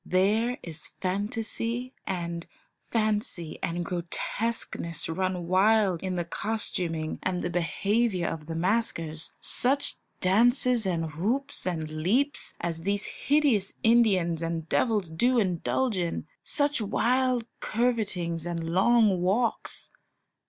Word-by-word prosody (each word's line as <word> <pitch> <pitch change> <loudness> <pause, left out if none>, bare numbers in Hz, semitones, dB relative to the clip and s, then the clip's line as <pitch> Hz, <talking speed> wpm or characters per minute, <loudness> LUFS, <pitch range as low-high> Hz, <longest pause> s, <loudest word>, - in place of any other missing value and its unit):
There 215 +8 +2
is 160 -2 -5
fantasy 225 +6 -2
and 170 -2 -3 0.4
fancy 210 - +1
and 170 +1 -2
grotesqueness 175 -1 -2
run 180 +1 -2
wild 190 0 +3
in 185 -1 -2
the 175 -1 -2
costuming 170 -5 -2
and 180 -1 -2
the 175 - -2
behaviour 190 +4 0
of 155 -2 -5
the 165 - -4
maskers. 165 -4 -1
Such 275 +3 +3 0.2
dances 235 +3 +3
and 165 -3 -1
whoops 225 - -1
and 160 -3 -2
leaps 255 - 0
as 165 -1 -3
these 200 +3 -1
hideous 275 -10 +1
Indians 195 -8 +3
and 165 -1 -3
devils 210 -4 +1
do 245 +10 +2
indulge 205 +4 0
in; 170 -4 -2 0.2
such 290 -4 +1
wild 245 +3 +1
curvetings 205 -8 -1
and 165 -1 -3
long 200 0 +4
walks! 215 +6 -1
190 Hz, 115 wpm, -27 LUFS, 170-230 Hz, 0.4 s, long